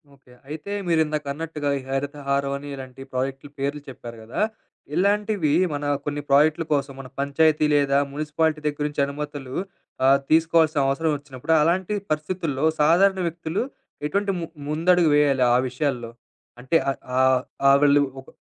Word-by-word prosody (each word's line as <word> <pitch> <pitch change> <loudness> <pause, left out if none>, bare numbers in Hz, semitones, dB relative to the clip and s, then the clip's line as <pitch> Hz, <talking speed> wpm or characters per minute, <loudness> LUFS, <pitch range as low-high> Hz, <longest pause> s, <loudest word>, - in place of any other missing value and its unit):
Okay. 130 -2 -21 0.2
అయితే 155 +6 -6 0.2
మీరిందాక 155 -3 +1
అన్నట్టుగా 155 -1 -4
ఈ - - -9
హరితహారం 140 0 -1
అని 145 +1 -9
ఇలాంటి 130 -1 -10
ప్రాజెక్ట్లు 135 +2 -3
పేర్లు 140 +2 -2
చెప్పారు 120 -2 -9
గదా! 115 - -4 0.5
ఇలాంటివి 205 -4 +1 0.2
మన 145 - -3 0.2
కొన్ని 145 0 -2
ప్రాజెక్ట్ల 150 +4 +4
కోసం 140 -1 -1
మన 135 - -8
పంచాయతీ 150 +2 +2
లేదా 140 -1 +3
మున్సిపాలిటీ 155 +1 -1
దగ్గరి 145 0 -2
నించి 145 -1 -2
అనుమతులు 140 -2 -6 0.5
ఆహ్, 135 +1 +6
తీసుకోవాల్సిన 160 -1 +4
అవసరం 155 +3 +1
ఒచ్చినప్పుడు, 140 +2 -3
అలాంటి 180 +5 +1 0.2
పరిస్థితుల్లో 155 -2 -1 0.2
సాధారణ 190 +5 +4
వ్యక్తులు 170 +3 -3 0.4
ఎటువంటి 200 +5 0
ము 170 - -3 0.2
ముందడుగు 165 +2 +3
వేయాలి 140 -3 +3
ఆ - - +5
విషయాల్లో? 125 -3 -2 0.5
అంటే 130 +6 -2 0.2
ఆహ్, - - -7 0.2
ఆహ్, 130 -1 +4 0.3
ఆ - - +8
వాళ్ళు 145 0 +5 0.2
ఒక 130 - -18
145 Hz, 145 wpm, -24 LUFS, 140-160 Hz, 0.5 s, ఆ